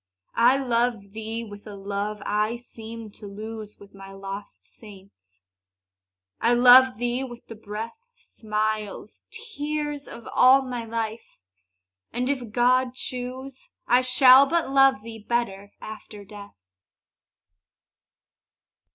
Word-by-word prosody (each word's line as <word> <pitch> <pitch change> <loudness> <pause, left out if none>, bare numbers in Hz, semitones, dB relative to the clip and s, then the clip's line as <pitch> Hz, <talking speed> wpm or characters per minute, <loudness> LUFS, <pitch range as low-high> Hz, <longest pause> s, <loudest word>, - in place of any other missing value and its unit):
I 245 +3 +4
love 235 -5 -1
thee 220 +2 -5
with 205 -1 -11
a 205 - -8
love 200 +1 -4
I 210 +2 0
seemed 230 -2 -10
to 210 - -10
lose 215 +1 -8
With 200 - -16
my 195 0 -12
lost 195 +1 -8
saints, 190 - -16 1.0
I 235 +1 +3
love 250 0 +7
thee 245 +2 -1
with 240 -2 -9
the - - -9
breath, 220 - -7 0.2
Smiles, 215 - -4
tears, 300 -9 -4
of 235 - -10
all 265 +2 +6
my 245 -3 -5
life! 225 - -5 0.7
and, 250 +3 -1
if 250 -6 -4
God 250 +2 +2
choose, 255 +1 -6 0.2
I 245 +1 +4
shall 255 +1 +7
but 335 -2 0
love 270 -4 +4
thee 225 -1 -9
better 205 -3 -3
after 215 -1 -10
death. 205 - -12
230 Hz, 120 wpm, -25 LUFS, 210-255 Hz, 1.0 s, love